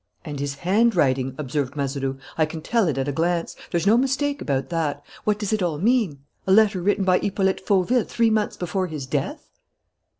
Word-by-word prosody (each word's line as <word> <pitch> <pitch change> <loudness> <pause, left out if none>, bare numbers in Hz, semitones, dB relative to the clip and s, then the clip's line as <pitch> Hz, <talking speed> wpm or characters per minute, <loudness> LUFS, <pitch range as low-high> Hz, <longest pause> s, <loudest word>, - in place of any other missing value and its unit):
"And 145 -3 -5
his 140 0 -3
handwriting," 170 - +2
observed 140 -1 -2
Mazeroux. 135 -1 -2 0.2
"I 155 -1 +2
can 155 0 -7
tell 230 -1 +2
it 145 -4 -1
at 135 0 -1
a - - 0
glance. 170 +3 -1
There's 170 0 -1
no 215 +3 +5
mistake 275 +2 0
about 135 -2 -1
that. 150 -4 -2 0.2
What 210 -1 +2
does 210 0 -2
it 215 - 0
all 170 -4 0
mean? 200 - +1 0.2
A - - +2
letter 205 -2 +5
written 200 +2 +1
by 185 -1 +3
Hippolyte 190 -1 0
Fauville 200 +5 +2
three 230 -1 +1
months 215 -1 0
before 185 +1 -2
his 155 -5 -5
death?" 130 - -3
175 Hz, 195 wpm, -23 LUFS, 145-210 Hz, 0.2 s, no